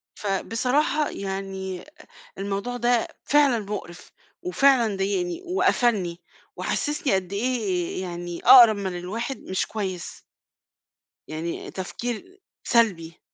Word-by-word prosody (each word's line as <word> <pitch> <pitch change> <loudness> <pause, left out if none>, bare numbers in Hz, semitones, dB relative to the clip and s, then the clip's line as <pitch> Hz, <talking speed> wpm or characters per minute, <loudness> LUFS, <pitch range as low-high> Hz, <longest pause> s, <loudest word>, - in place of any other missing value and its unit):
فبصراحة 250 +9 0
يعني 190 -1 -5 0.5
الموضوع 200 +5 -3
ده 240 -1 +2 0.2
فعلًا 285 -4 +4
مقرِف 200 -4 -7 0.3
وفعلًا 270 - +3
ضايقني 195 - -1
وقفَلني 235 - +1 0.4
وحسّسني 295 - -1
قد 190 -1 -2
إيه 200 -6 -1
يعني 175 -1 -5
أقرّب 240 -4 +9
من 190 -3 -3
الواحد 225 +9 -4
مش 185 - -2
كويس. 190 -5 -5 1.1
يعني 160 +2 -5
تفكير 245 - -6 0.2
سلبي. 180 -9 +1
200 Hz, 95 wpm, -25 LUFS, 185-245 Hz, 1.1 s, أقرّب